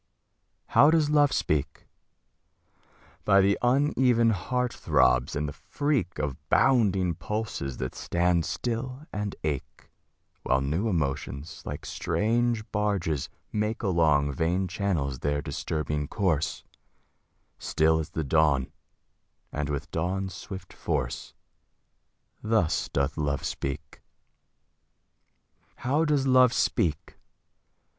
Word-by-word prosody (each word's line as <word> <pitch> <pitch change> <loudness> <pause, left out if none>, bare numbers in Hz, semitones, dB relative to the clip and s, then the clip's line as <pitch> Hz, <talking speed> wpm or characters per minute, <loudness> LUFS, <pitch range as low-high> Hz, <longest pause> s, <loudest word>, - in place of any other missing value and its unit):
How 145 - +6
does 155 -2 +3
Love 145 -2 +4
speak? 70 -1 -1 1.4
By 100 - +5
the 100 +1 +4
uneven 125 -3 +3
heart 125 +5 -1
throbs, 65 -3 +2
and 75 0 -1
the 75 - -5
freak 140 - -2
Of 75 -3 -2
bounding 100 -8 +3
pulses 105 - -4
that 65 - -4
stand 85 -1 +1
still 125 +4 -3
and 105 -1 -3
ache, 75 -4 -4 0.5
While 65 - +2
new 80 +11 0
emotions, 75 -3 -3
like - - -6
strange 115 +1 0
barges, 100 -9 -1 0.2
make 105 +2 -2
Along 80 -7 +3
vein 85 +6 0
channels 85 -9 -1
their 75 0 0
disturbing 75 0 -3
course; 85 -7 -1 1.0
Still 80 +1 +2
as 80 - -4
the 80 - -3
dawn, 70 -3 +2 0.8
and 75 -1 -3
with 70 0 -2
the - - -26
dawn's 95 +3 -2
swift 95 +2 -9
force - - -3 1.1
Thus 110 -7 +1
doth 70 +1 -1
Love 70 -2 -1
speak. 75 +3 -5 1.7
How 145 +6 +1
does 145 -3 +2
Love 130 -2 +5
speak? 80 -4 0
90 Hz, 110 wpm, -27 LUFS, 75-115 Hz, 1.7 s, How